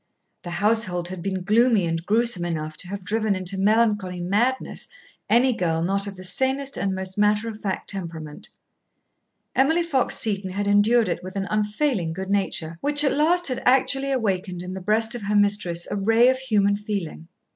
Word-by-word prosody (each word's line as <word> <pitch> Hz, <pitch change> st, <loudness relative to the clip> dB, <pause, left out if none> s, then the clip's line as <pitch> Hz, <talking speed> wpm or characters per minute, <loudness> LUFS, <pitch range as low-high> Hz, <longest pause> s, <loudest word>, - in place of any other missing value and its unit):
The 175 Hz, -, -8 dB
household 185 Hz, -1 st, 0 dB
had 185 Hz, -2 st, -7 dB
been 190 Hz, 0 st, -3 dB
gloomy 220 Hz, 0 st, +3 dB
and 165 Hz, 0 st, -2 dB
gruesome 220 Hz, -1 st, +2 dB
enough 155 Hz, -2 st, -4 dB
to 180 Hz, -, -8 dB
have 195 Hz, 0 st, -7 dB
driven 215 Hz, 0 st, 0 dB
into 185 Hz, +1 st, -2 dB
melancholy 205 Hz, -2 st, +1 dB
madness 210 Hz, +9 st, -1 dB, 0.4 s
any 250 Hz, +2 st, +4 dB
girl 165 Hz, -6 st, -1 dB
not 195 Hz, +3 st, 0 dB
of 200 Hz, -, -6 dB
the 185 Hz, -, -11 dB
sanest 265 Hz, +8 st, -1 dB
and 195 Hz, -1 st, -1 dB
most 190 Hz, +1 st, -4 dB
matter 210 Hz, +2 st, +2 dB
of 220 Hz, -1 st, -7 dB
fact 195 Hz, -2 st, -3 dB
temperament. 165 Hz, -6 st, -7 dB, 1.1 s
Emily 320 Hz, +6 st, +3 dB
Fox 275 Hz, -7 st, 0 dB
Seton 200 Hz, -3 st, 0 dB
had 200 Hz, +2 st, -3 dB
endured 210 Hz, +3 st, +4 dB
it 170 Hz, -, -2 dB
with 185 Hz, +1 st, -8 dB
an 195 Hz, -1 st, -2 dB
unfailing 210 Hz, -, 0 dB
good 190 Hz, +3 st, -5 dB
nature, 170 Hz, -5 st, -1 dB
which 290 Hz, 0 st, +2 dB
at 280 Hz, -, +3 dB
last 340 Hz, +4 st, +3 dB
had 255 Hz, -2 st, -2 dB
actually 270 Hz, +2 st, +2 dB
awakened 190 Hz, -7 st, -2 dB
in 180 Hz, +1 st, -6 dB
the 190 Hz, -, -6 dB
breast 220 Hz, +4 st, +1 dB
of 240 Hz, -, -4 dB
her 205 Hz, +1 st, -1 dB
mistress 200 Hz, -4 st, +1 dB
a -, -, -1 dB
ray 225 Hz, +5 st, +4 dB
of 260 Hz, 0 st, +1 dB
human 205 Hz, -6 st, +2 dB
feeling. 200 Hz, -6 st, -5 dB
205 Hz, 185 wpm, -23 LUFS, 185-230 Hz, 1.1 s, any